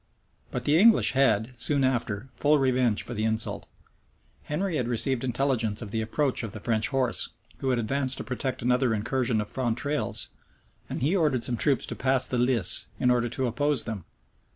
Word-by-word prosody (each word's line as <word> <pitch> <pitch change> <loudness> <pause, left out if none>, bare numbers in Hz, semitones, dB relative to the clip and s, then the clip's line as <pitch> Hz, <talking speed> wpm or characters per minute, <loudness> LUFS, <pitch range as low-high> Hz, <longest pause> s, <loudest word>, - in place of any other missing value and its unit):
[*] - - -40
But 125 - -3
the 150 +3 +4
English 225 +2 +6
had, 120 -3 +2
soon 140 -2 +1
after, 120 -2 -1
full 150 +1 +2
revenge 130 -5 +1
for 120 - -7
the 110 -2 -3
insult. 110 0 -2 0.8
Henry 165 +2 -2
had 125 - -1
received 120 +2 +1
intelligence 125 -4 0
of 105 - -9
the 110 0 -1
approach 130 +5 -1
of 110 -4 -6
the 110 - -7
French 110 +1 0
horse, 130 -3 0 0.3
who 135 - -2
had 125 - +1
advanced 130 +3 -1
to - - -5
protect 130 -1 -4
another 125 -1 +2
incursion 115 +1 0
of 105 - -3
Fontrailles; 130 +5 -1 0.6
and - - -4
he 160 +8 +2
ordered 150 -9 +1
some 125 - -1
troops 135 +2 +1
to - - -6
pass 130 0 +2
the 125 - -1
Lis, 120 -6 +3
in 125 - +3
order 120 -1 +1
to 130 +2 -2
oppose 145 +3 0
them. 110 -6 -6
125 Hz, 190 wpm, -26 LUFS, 115-135 Hz, 0.8 s, English